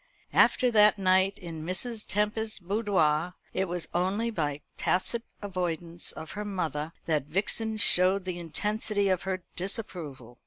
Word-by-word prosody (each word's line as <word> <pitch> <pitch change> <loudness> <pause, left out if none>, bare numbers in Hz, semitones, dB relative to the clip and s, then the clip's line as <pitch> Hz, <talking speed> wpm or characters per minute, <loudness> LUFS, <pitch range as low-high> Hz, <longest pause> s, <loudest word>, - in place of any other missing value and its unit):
After 250 -2 +4
that 210 -1 +6
night 190 0 +3
in 165 -4 -7
Mrs. 210 +6 -3
Tempest's 210 +2 0
boudoir, 180 -4 +1 0.2
it 190 - 0
was 175 -2 -3
only 195 +6 0
by 150 -7 -2
tacit 230 +6 0 0.2
avoidance 175 -3 -3
of 160 0 -8
her 210 - -4
mother 165 -6 -3
that 155 -4 0
Vixen 210 +7 0
showed 185 -1 +5
the 180 -1 -4
intensity 205 +4 -1
of 185 -2 +1
her 185 -1 -2
disapproval. 160 - -5
185 Hz, 140 wpm, -28 LUFS, 165-210 Hz, 0.2 s, that